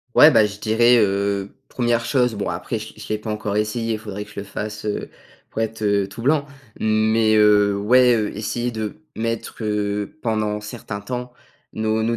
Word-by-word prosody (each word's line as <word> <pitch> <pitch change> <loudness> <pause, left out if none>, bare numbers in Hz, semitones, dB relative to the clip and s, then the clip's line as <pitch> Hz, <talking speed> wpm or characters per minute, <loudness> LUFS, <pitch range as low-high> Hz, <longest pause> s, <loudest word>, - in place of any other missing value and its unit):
Ouais, 155 - +9
bah, 110 - +6
je 100 -1 -6
dirais, 120 +3 +4
heu, 100 -1 +1
1re 120 -1 0
chose, 125 -3 +2
bon, 100 -1 -3
après 115 - -3
je 110 +1 -9
l'ai - - -16
je - - -9
l'ai 110 - -1
pas 110 - -7
encore 105 -1 -2
essayé, 115 +2 -1
il 110 - -3
faudrait 105 -1 -6
que 105 - -16
je - - -7
le - - -4
fasse, 105 +2 -6
heu, 105 - -3 0.4
pour 110 - -2
être, 110 0 -3
heu, 100 -1 +2
tout 115 +4 -8
blanc. 145 +2 +2 0.3
Mais 110 0 +3
heu, 105 -1 +5
ouais, 125 +4 +5
heu, 105 -2 -2
essayer 120 +3 -2
de 110 0 -4 0.2
mettre, 115 0 -3
heu, 105 +3 -2
pendant 105 -2 -1
certain 105 -1 -6
temps, 125 +4 -5 0.4
nos 110 0 0
nos 115 +1 0
110 Hz, 200 wpm, -22 LUFS, 105-115 Hz, 0.4 s, Ouais